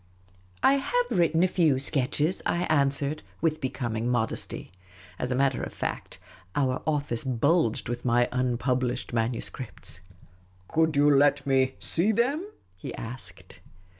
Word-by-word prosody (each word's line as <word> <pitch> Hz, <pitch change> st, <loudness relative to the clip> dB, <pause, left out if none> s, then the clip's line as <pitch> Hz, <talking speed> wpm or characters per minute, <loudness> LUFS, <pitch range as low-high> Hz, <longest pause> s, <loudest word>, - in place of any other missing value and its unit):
" 90 Hz, 0 st, -31 dB
I -, -, +3 dB
have -, -, 0 dB
written 165 Hz, 0 st, +3 dB
a -, -, +5 dB
few 160 Hz, -7 st, +3 dB
sketches," 145 Hz, +5 st, +1 dB
I 175 Hz, -, 0 dB
answered, 140 Hz, 0 st, +1 dB, 0.2 s
with 155 Hz, -1 st, 0 dB
becoming 120 Hz, -3 st, -2 dB
modesty. 115 Hz, -7 st, -2 dB, 0.5 s
As 125 Hz, -, -2 dB
a -, -, +1 dB
matter 135 Hz, 0 st, +1 dB
of -, -, -4 dB
fact, -, -, -5 dB, 0.4 s
our 130 Hz, -3 st, +1 dB
ofl&ce 145 Hz, -6 st, 0 dB
bulged 130 Hz, 0 st, +1 dB
with 120 Hz, +1 st, -4 dB
my 120 Hz, 0 st, +3 dB
un 125 Hz, -1 st, 0 dB
published 125 Hz, -1 st, -1 dB
manuscripts. 115 Hz, -4 st, -3 dB, 0.3 s
" 90 Hz, 0 st, -31 dB
Could 160 Hz, -1 st, +1 dB
you 145 Hz, 0 st, +5 dB
let 145 Hz, 0 st, +4 dB
me 130 Hz, -1 st, +2 dB
see 185 Hz, +7 st, +1 dB
them? 255 Hz, -, +1 dB, 0.2 s
" 90 Hz, -, -38 dB
he -, -, -6 dB
asked. 115 Hz, +2 st, -9 dB
135 Hz, 150 wpm, -27 LUFS, 120-155 Hz, 0.5 s, a